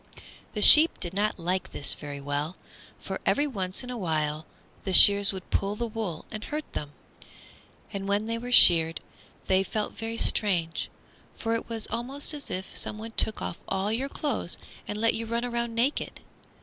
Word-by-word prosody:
The 210 - 0
sheep 310 +8 +10
did 175 0 -6
not 210 +2 -2
like 180 +1 -4
this 140 - -3
very 145 -1 -9
well, 145 +4 -5 0.4
for - - -8
every 290 - 0
once 195 -7 -4
in 250 - -8
a 245 - -6
while 155 -3 -3 0.4
the 190 - -4
shears 200 +2 +8
would 190 -2 -9
pull 200 +1 -2
the 235 - -4
wool 215 -8 -6
and 215 -1 -7
hurt 300 +5 -6
them; 145 -1 -7 1.0
and 195 -1 -6
when 205 +2 -1
they 230 +1 -4
were 245 +1 -8
sheared 165 -8 +6 0.5
they 190 0 +1
felt 210 +2 -4
very 225 +1 -6
strange, 175 -8 0 0.5
for 225 -1 -4
it 230 - -5
was 225 -2 -4
almost 265 +7 -4
as 290 -1 -8
if 190 +1 -7
someone 220 +2 -5
took 220 -1 0
off - - -6
all 195 +2 -3
your 260 +5 -2
clothes 280 - -4 0.3
and 210 - -6
let 230 +1 +1
you 230 0 -6
run 235 +2 -3
around 235 -1 -4
naked. 250 +5 -2
210 Hz, 180 wpm, -25 LUFS, 185-230 Hz, 1.0 s, sheep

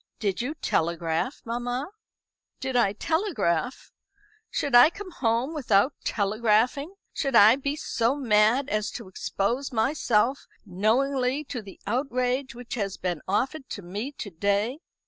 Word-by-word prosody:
"Did 205 -1 -1
you 280 +6 -3
telegraph, 170 - -1
mamma?" 245 +3 -2 0.7
"Did 265 -2 -3
I 220 -5 +3
telegraph? 265 - -1 0.6
Should 285 - -2
I 245 +5 +9
come 375 +2 -9
home 240 +2 0
without 255 -3 +2
telegraphing? 225 - +1 0.2
Should 275 -4 -1
I 220 +1 +8
be 280 +1 -2
so 245 -4 0
mad 240 0 +3
as 215 0 0
to 230 -5 -7
expose 230 +8 -2
myself 245 0 +1 0.2
knowingly 250 +8 +1
to 255 -4 -5
the 195 -2 -13
outrage 255 +2 -1
which 245 -1 -8
has 200 -5 -3
been 175 -4 -3
offered 265 +8 -1
to 200 - -6
me 205 +10 -5
to 200 - -7
day?" 205 - 0
240 Hz, 135 wpm, -26 LUFS, 205-275 Hz, 0.7 s, I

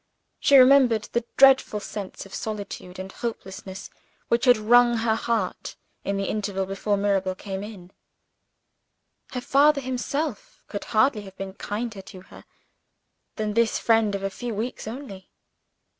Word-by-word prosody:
She 280 - +6
remembered 255 -4 +5
the 235 0 0
dreadful 265 -5 +5
sense 200 -2 -7
of 195 - -14
solitude 205 -4 -6
and 190 +1 -7
helplessness 190 -4 -7 0.4
which 235 +2 +2
had 245 -2 +6
wrung 240 +2 +5
her 225 0 +1
heart, 225 -3 -2 0.3
in 200 0 -2
the 195 - -1
interval 200 -2 -2
before 195 +2 -1
Mirabel 195 -2 0
came 190 0 -6
in. 200 -4 -10 1.4
Her 250 - -3
father 285 +3 +4
himself 260 0 -4
could 205 - -6
hardly 225 0 +2
have 195 -1 -13
been 195 -1 -6
kinder 210 +1 -5
to 190 -1 -12
her - - -15 0.9
than 215 -1 -2
this 230 0 +2
friend 225 -3 +2
of 195 - -5
a 195 - -2
few 235 +2 -5
weeks 230 +1 -4
only. 220 -6 -8
215 Hz, 145 wpm, -25 LUFS, 195-245 Hz, 1.4 s, She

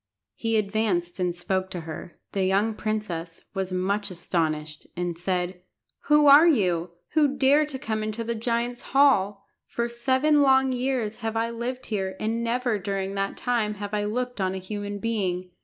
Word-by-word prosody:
He 225 - 0
advanced 200 -4 0
and 180 -1 0
spoke 190 +1 -1
to 180 -3 -5
her. 160 +1 -8
The 195 - 0
young 200 +4 +2
princess 200 -7 -4
was 190 -2 -3
much 200 +3 -1
astonished, 155 -4 -2
and 175 -1 -2
said 180 +1 -2 0.4
"Who 300 0 +5
are 290 +4 +9
you, 180 - +2 0.2
who 295 -3 +2
dare 285 +3 +4
to 280 -3 -5
come 220 -4 -3
into 215 +2 -3
the 235 +1 -2
giant's 235 +1 -1 0.2
hall? 205 -8 +4 0.2
For 235 0 -2
seven 260 +5 +2
long 265 -1 +4
years 250 -4 -1
have 225 -1 -3
I 230 +1 0
lived 245 +2 -4
here, 190 -3 -2
and 225 +2 -1
never 235 -2 0
during 195 0 -3
that 195 0 -2
time 225 -4 0
have 205 0 -6
I 205 0 0
looked 245 +1 -2
on 190 0 0
a - - -3
human 205 +2 -5
being. 190 -5 -2
210 Hz, 175 wpm, -26 LUFS, 185-240 Hz, 0.4 s, are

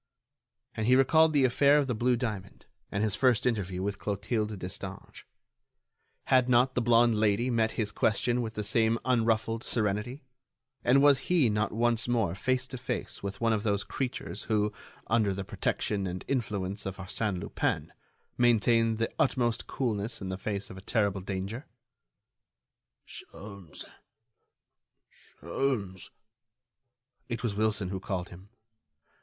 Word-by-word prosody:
And 110 0 -2
he 125 - +6
recalled 155 +5 +5
the 145 -3 +4
affair 140 +3 +4
of 145 - +2
the 130 - -1
blue 120 +2 +1
diamond 105 -6 -5 0.3
and 100 +1 -1
his 110 -2 0
first 125 -1 +2
interview 95 -6 -1
with 100 0 -3
Clotilde 105 +1 -2
Destange. 90 0 -7 1.0
Had 130 -1 +3
not 125 +1 +4
the 125 - 0
blonde 115 -1 +4
Lady 110 +4 +2
met 115 -1 +1
his 105 -2 -2
question 120 +4 +1
with 110 -1 -5
the 105 - -2
same 110 +2 +2
unruffled 115 -2 +1
serenity, 110 +5 -1 0.6
and 135 +3 +4
was 145 -2 +6
he 160 -11 +4
not 105 +1 0
once 115 0 +1
more 115 -8 +1
face 130 +7 0
to 130 -1 -8
face - - -4
with 100 0 -5
one 115 -1 +3
of 105 - 0
those 105 -2 0
creatures 110 -5 -4
who, 105 -1 +1 0.3
under 110 -4 +1
the 100 - -4
protection 100 +1 -2
and 90 +1 -5
influence 100 -6 -2
of 95 - -5
Arsène 95 0 -2
Lupin, - - -2 0.5
maintain 115 -1 +3
the 115 0 -2
utmost 120 -3 +1
coolness 115 -4 -2
in 95 - -5
the 95 - -2
face 100 0 -4
of 95 - -9
a - - -13
terrible 100 -1 0
danger? 100 +7 -5 1.4
"Sholmes... 100 -6 -10 1.3
Sholmes...." 95 - -4 1.2
It 115 0 -4
was 115 -4 0
Wilson 105 -2 0
who 95 0 -3
called 90 -2 -4
him. 95 +3 -13
110 Hz, 145 wpm, -29 LUFS, 100-120 Hz, 1.4 s, he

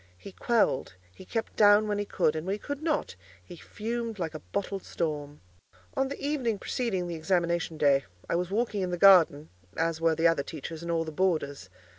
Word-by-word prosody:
He 195 - -11
quelled, 215 - +1 0.2
he 190 - -13
kept 225 +3 -3
down 205 0 +6
when 205 -1 -1
he 205 - -1
could; 165 -5 +1
and 155 +3 -4
when 195 - 0
he - - -6
could 285 +6 -6
not, 310 - -1 0.3
he 175 - -11
fumed 230 +5 -5
like 170 -3 -3
a 155 - -6
bottled 195 +3 -4
storm. 150 -3 -4 0.5
On 270 0 +1
the 280 - -6
evening 270 -7 -1
preceding 195 -4 -2
the 175 - -4
examination 170 0 0
day, 140 -2 +3 0.2
I - - -2
was 175 +1 0
walking 210 0 -1
in 185 - -1
the 175 - -2
garden, 170 -6 +6 0.3
as 165 0 0
were 165 -1 +3
the 165 +1 +4
other 165 -4 +2
teachers 155 +2 -7
and 170 - -6
all 165 -1 +1
the 160 - -6
boarders. 150 - -1
175 Hz, 205 wpm, -28 LUFS, 160-210 Hz, 0.5 s, down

